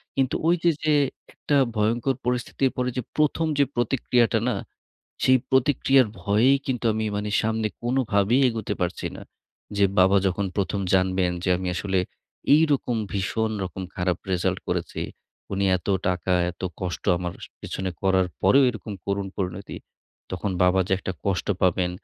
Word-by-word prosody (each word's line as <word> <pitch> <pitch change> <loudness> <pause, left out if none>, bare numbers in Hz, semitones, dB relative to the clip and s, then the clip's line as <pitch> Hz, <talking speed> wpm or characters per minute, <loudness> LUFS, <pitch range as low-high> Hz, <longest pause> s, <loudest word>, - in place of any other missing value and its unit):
কিন্তু 135 -2 +1
ওই 175 - +5
যে, 170 - +5
যে 155 -1 +3 0.4
একটা 145 - -1 0.2
ভয়ংকর 115 +5 +1
পরিস্থিতির 125 +2 0
পরে 125 0 0
যে - - +1 0.2
প্রথম 155 +2 +2
যে - - +7
প্রতিক্রিয়াটা 120 -1 +2
না, - - 0 0.7
সেই 130 0 +5
প্রতিক্রিয়ার 135 -1 +4
ভয়েই 115 +7 +4
কিন্তু 125 -3 -2
আমি 110 0 -2
মানে 105 0 -3
সামনে 110 0 0
কোনভাবেই 120 -2 +2
এগোতে 110 -3 -3
পারছি 90 0 -2
না। - - -10 0.5
যে 100 - +4
বাবা 95 +2 +5
যখন 95 +2 0
প্রথম 100 0 -1
জানবেন 95 -1 +2
যে - - 0
আমি 90 0 -3
আসলে 95 0 -1 0.6
এই 155 - +5
রকম 125 -3 0 0.2
ভীষণ 110 +3 -1
রকম 95 +1 -6
খারাপ 90 -1 0
রেজাল্ট 90 -1 0
করেছি। - - -2 0.5
উনি 100 0 0
এত 90 - -11 0.2
টাকা, 90 0 -1 0.2
এত 90 - -15 0.2
কষ্ট 90 -2 -4
আমার 90 -1 -3 0.3
পেছনে 95 -1 -4
করার 95 -1 +3 0.2
পরেও 120 +9 +6
এরকম 110 -2 -7
করুণ 100 0 -1
পরিণতি। 95 0 -4 0.5
তখন 95 +2 -2
বাবা 90 +1 +4
যে - - -2
একটা 95 - -4
কষ্ট 95 0 -1
পাবেন, 90 0 +2
105 Hz, 155 wpm, -24 LUFS, 95-125 Hz, 0.7 s, যে